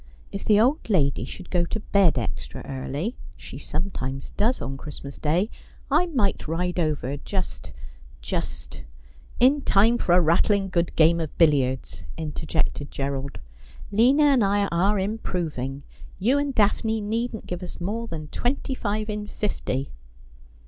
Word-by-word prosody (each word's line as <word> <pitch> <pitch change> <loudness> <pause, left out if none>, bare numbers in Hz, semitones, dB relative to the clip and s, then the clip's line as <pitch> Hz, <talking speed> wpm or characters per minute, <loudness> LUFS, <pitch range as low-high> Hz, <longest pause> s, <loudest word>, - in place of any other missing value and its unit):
If 200 - -5
the 210 -1 +5
old 260 +4 +2
lady 145 -9 +2
should 185 - -9
go 175 -2 +3
to 220 - -3
bed 200 -7 +3
extra 85 -9 -4
early 140 - -4
— - - -18
she 135 - -9
sometimes 140 -5 -4
does 230 +5 +1
on 135 - -4
Christmas 140 0 -8
Day 175 +8 +1 0.2
— - - -26
I 325 +5 +4
might 240 - 0
ride 180 +3 -1
over, 145 -4 -1
just 185 +4 -4 0.3
— - - -22
just - - -4 0.3
' 70 +3 -21
'In 270 +4 +5
time 230 +1 +4
for 175 - +2
a - - +7
rattling 195 +4 +3
good 175 -1 0
game 165 +1 +5
of 160 -2 -4
billiards,' 130 - +2
interjected 155 -2 -2
Gerald. 140 0 -3 0.3
' 70 - -17
Lina 250 +8 +5
and 275 -5 +5
I 200 +1 +2
are 190 +5 +2
improving. 165 - -3 0.3
You 245 +9 +3
and 285 -2 -1
Daphne 220 +1 +2
needn't 225 +2 -2
give 180 0 -5
us 180 - -7
more 220 +6 -3
than 160 -6 -5
twenty 265 +2 -1
five 215 -3 -2
in 210 -1 -4
fifty.' 140 -11 -2
180 Hz, 160 wpm, -25 LUFS, 145-215 Hz, 0.3 s, a